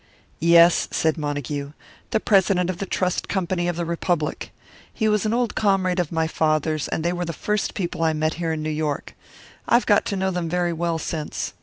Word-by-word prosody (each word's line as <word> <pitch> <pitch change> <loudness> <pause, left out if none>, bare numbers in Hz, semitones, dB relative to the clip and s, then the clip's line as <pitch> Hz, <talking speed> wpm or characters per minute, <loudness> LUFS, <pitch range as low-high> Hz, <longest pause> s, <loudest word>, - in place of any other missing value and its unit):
"Yes," 170 +1 +5
said 160 -1 +1
Montague, 145 -2 -4 0.4
"the 220 - +1
president 190 -4 +3
of 180 - -9
the 195 - -3
Trust 180 -1 -1
Company 180 -2 -1
of 175 - -1
the 170 0 -2
Republic. 170 -2 -2 0.4
He 220 - -1
was 210 0 +2
an - - 0
old 240 -3 0
comrade 190 -3 +1
of 175 -4 -1
my 160 -1 +1
father's, 155 -1 0
and 160 - -2
they 175 - +1
were 175 0 -2
the 170 -1 -4
first 210 +5 -2
people 175 -4 -3
I 160 -1 +2
met 155 +1 0
here 165 -1 0
in 155 -1 -3
New 155 - -2
York. 150 -2 -3 0.5
I - - +4
have 245 - +3
got 205 -1 +3
to 200 - -2
know 190 0 0
them 175 -2 -2
very 175 0 0
well 165 0 -1
since. 155 -1 -4
170 Hz, 210 wpm, -23 LUFS, 155-190 Hz, 0.5 s, Yes